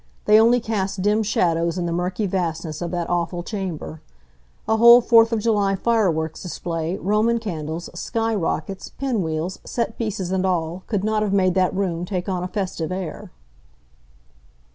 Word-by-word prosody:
They 210 +1 +6
only 235 +2 +5
cast 195 -4 -2
dim 210 +2 +3
shadows 170 -5 +1
in 175 - -1
the 170 - -2
murky 180 +4 -1
vastness 165 -4 -3
of 175 - -2
that 175 -1 -2
awful 175 0 -1
chamber. 180 -6 -5 0.7
A 220 - +2
whole 235 +2 +9
Fourth 230 -1 +5
of 225 -2 0
July 205 -3 +2
fireworks 180 -8 0
display, 170 0 -3
Roman 215 +4 +1
candles, 165 -6 -5
sky 225 +5 -2
rockets, 190 -1 -3
pin 260 -6 -2
wheels, 160 +2 -3
set 235 -2 -3
pieces 195 -5 -3
and 190 -1 0
all, 175 -1 -1
could 205 -4 -1
not 215 0 +1
have 205 -2 0
made 185 -2 +3
that 185 0 +1
room 180 -3 -1
take 180 0 -3
on 185 -2 -2
a - - -2
festive 185 -4 -3
air. 185 -2 -5
190 Hz, 165 wpm, -22 LUFS, 175-215 Hz, 0.7 s, whole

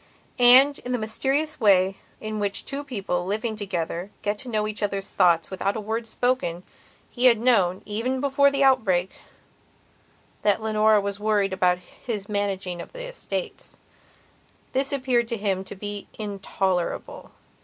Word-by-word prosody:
And, 260 +4 +7
in 250 - -4
the - - +1
mysterious 270 +8 -1
way 195 -3 +4 0.2
in 215 0 -4
which 200 -1 -1
two 280 +1 -3
people, 195 -10 -3
living 215 +4 -2
together, 180 -3 -4
get 205 0 -1
to 260 - -6
know 215 -2 0
each 215 +1 -5
other's 200 -1 -2
thoughts 170 -3 +3
without 195 +1 -1
a - - -2
word 225 +2 -3
spoken, 225 -9 -1 0.5
he 245 0 0
had 240 -3 +7
known, 200 -6 +2
even 235 +5 -2
before 280 +1 +3
his 275 0 +1
outbreak, 200 -9 +3 1.3
that 205 0 +2
Leonora 215 -1 +3
was 200 0 -4
worrying 205 -2 +1
about 180 -1 +2
his 200 +3 -7
managing 195 -4 -2
of - - -11
the - - -6
estates. - - -5 0.9
This 270 +2 +2
appeared 255 -4 +1
to 230 -1 -3
him 195 -2 -1
to 195 - -7
be 205 +1 -6
intolerable. 195 -3 -3
215 Hz, 155 wpm, -25 LUFS, 195-250 Hz, 1.3 s, And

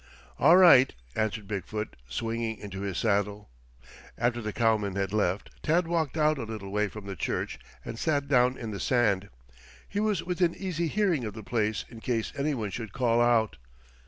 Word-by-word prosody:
"All 175 - +7
right," 170 -9 +8 0.2
answered 110 -1 -1
Big 100 -2 -3
foot, 105 0 -4
swinging 115 - -2
into 100 -1 -7
his 100 -3 -3
saddle. 105 - 0 0.7
After 120 0 0
the 105 -1 -3
cowmen 105 -4 +1
had 100 0 -1
left, 100 -2 0
Tad 165 +2 +2
walked 165 -3 -1
out 155 -1 +3
a - - -3
little 110 -3 -6
way 105 +1 +1
from 105 0 -9
the 100 -1 -5
church - - -3 0.3
and 115 - -6
sat 145 -3 0
down 125 -1 +3
in 115 -2 -5
the 100 - -5
sand. 100 -4 +1 0.6
He 205 - -3
was 210 -5 +1
within 175 -1 0
easy 170 -3 -2
hearing 180 - +1
of 105 -2 -5
the 110 - -8
place 110 -1 -1
in 115 - -11
case 115 -1 -2
anyone 140 -8 -1
should 110 0 -6
call 120 -2 +2
out. 115 -5 +3
115 Hz, 185 wpm, -28 LUFS, 105-140 Hz, 0.7 s, right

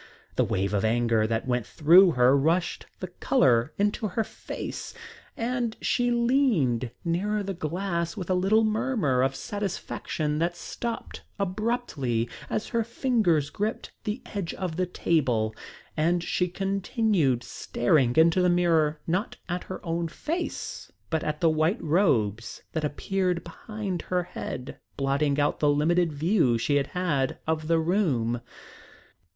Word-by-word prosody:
The - - +3
wave 95 +1 -1
of 100 - +1
anger 115 -1 +2
that 115 +2 -2
went 125 -1 +1
through 170 - +6
her 125 +1 +5
rushed 165 +5 +1
the - - -3
colour 120 +2 +2
into 205 +2 +1
her 215 +4 -1
face - - -7 0.4
and 235 -1 -1
she 245 -1 +1
leaned 235 - +2 0.2
nearer 205 +5 0
the 195 0 -3
glass 170 +1 -2
with 185 -4 -4
a 185 - +1
little 195 +5 +3
murmur 215 - +1
of 135 +1 +1
satisfaction 170 -6 -3
that 175 +1 0
stopped 235 +5 -5 0.2
abruptly 185 - -1 0.2
as 215 - -2
her 230 -1 +1
fingers 215 - +1
gripped 215 +2 -3
the 215 +3 -3
edge 195 -5 -4
of 180 -4 -3
the 180 +1 0
table, 125 -11 +1 0.4
and 170 +2 +1
she 180 +1 0
continued 195 - 0
staring 120 +2 +1
into 165 +3 +5
the 180 - +4
mirror 165 -4 +2
not 185 +7 -1
at 175 0 -3
her 185 - -7
own 170 0 -1
face, 330 - -4 0.2
but 160 -1 0
at 150 0 -3
the 165 - +5
white 155 +8 +1
robes 115 - +1
that 160 - -2
appeared 180 +3 -1
behind 195 +1 -5
her 180 -1 -1
head, 130 -6 -6 0.2
blotting 140 +1 +1
out 145 0 +1
the 150 - +3
limited 165 +4 +2
view 150 - +2
she 145 +6 +1
had 140 -1 0
had 150 -8 -1
of 155 -1 -1
the 165 0 +3
room. 155 - +1
170 Hz, 145 wpm, -27 LUFS, 140-200 Hz, 0.4 s, through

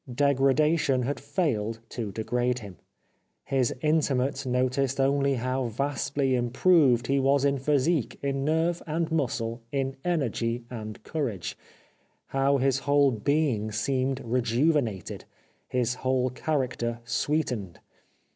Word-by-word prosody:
Degradation 140 +1 +2
had 140 +4 -2
failed 130 - -1
to 110 -5 -4
degrade 120 +4 -1
him. 100 -7 -9 0.7
His 130 -3 +1
intimates 140 -3 +1
noticed 130 +2 0
only 140 0 +2
how 130 +1 -1
vastly 135 +2 -1
improved 125 +1 +3
he 140 0 +2
was 135 +1 +3
in 140 -1 +2
physique, 145 0 +1
in 135 -1 -1
nerve 160 +3 +1
and 160 +1 -1
muscle, 125 -6 -1
in 135 -1 -1
energy 120 -8 -1
and 110 -3 -7
courage; 125 - -3 0.7
how 135 +1 +2
his 135 0 +2
whole 140 0 +3
being 120 -2 0
seemed 130 +4 -1
rejuvenated, 120 - 0 0.4
his 125 -1 0
whole 130 0 0
character 125 -4 -2
sweetened. 120 - -1
135 Hz, 115 wpm, -27 LUFS, 120-140 Hz, 0.7 s, improved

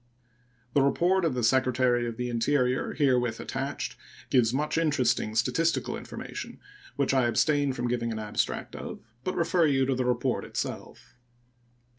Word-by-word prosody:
The 140 - +4
report 175 +7 +2
of 150 -6 0
the 125 - -1
Secretary 125 0 +2
of 115 -1 -5
the 125 - -2
Interior 125 +2 +1
herewith 125 -5 +2
attached 135 +2 -4 0.4
gives 120 -4 +4
much 150 +4 -1
interesting 130 -8 +1
statistical 165 +9 +1
information, - - -7 0.4
which 140 -1 +1
I 130 -3 +3
abstain 145 +3 +2
from 125 -1 -2
giving 120 -1 -1
an 110 - -3
abstract 105 -1 -2
of, - - -7 0.2
but 185 - -2
refer 170 0 +3
you 135 -2 +2
to 135 - +1
the 130 0 0
report 125 0 0
itself. - - -6
130 Hz, 150 wpm, -28 LUFS, 120-145 Hz, 0.4 s, The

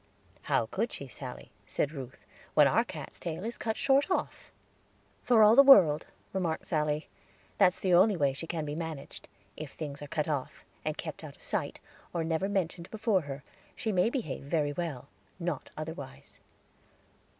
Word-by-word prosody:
"How - - +3
could - - -2
she, - - -7
Sally," - - -8 0.2
said 145 - -1
Ruth, 130 -5 -9 0.3
"when - - +7
our - - +3
cat's - - -9
tail 170 +1 -4
is 235 - -5
cut 220 -1 -2
short 275 +4 +3
off?" 370 - -2 0.7
"For 230 -3 +5
all 215 +2 +7
the 275 - +10
world," 190 - +7 0.3
remarked 175 -4 -1
Sally, 150 -2 0 0.5
"that's 185 -3 +5
the 185 -2 +1
only 190 +3 +6
way 140 -3 +2
she 155 +5 -7
can 160 -2 -3
be 145 - -4
managed. 160 -3 -6 0.3
If 150 -3 -8
things 145 -2 -6
are 145 - -6
cut 150 +1 -1
off, 145 -4 -3 0.2
and - - -2
kept - - -6
out - - -9
of - - -17
sight, - - -2 0.4
or 165 - +1
never 160 +4 0
mentioned 180 -3 -2
before 220 -3 +1
her, 140 -2 -7 0.3
she 220 - -2
may 185 +3 +3
behave 235 - -3
very 145 +1 0
well; 155 -7 -4 0.3
not 170 -5 -3
otherwise." 155 - -8
165 Hz, 170 wpm, -30 LUFS, 145-195 Hz, 0.7 s, the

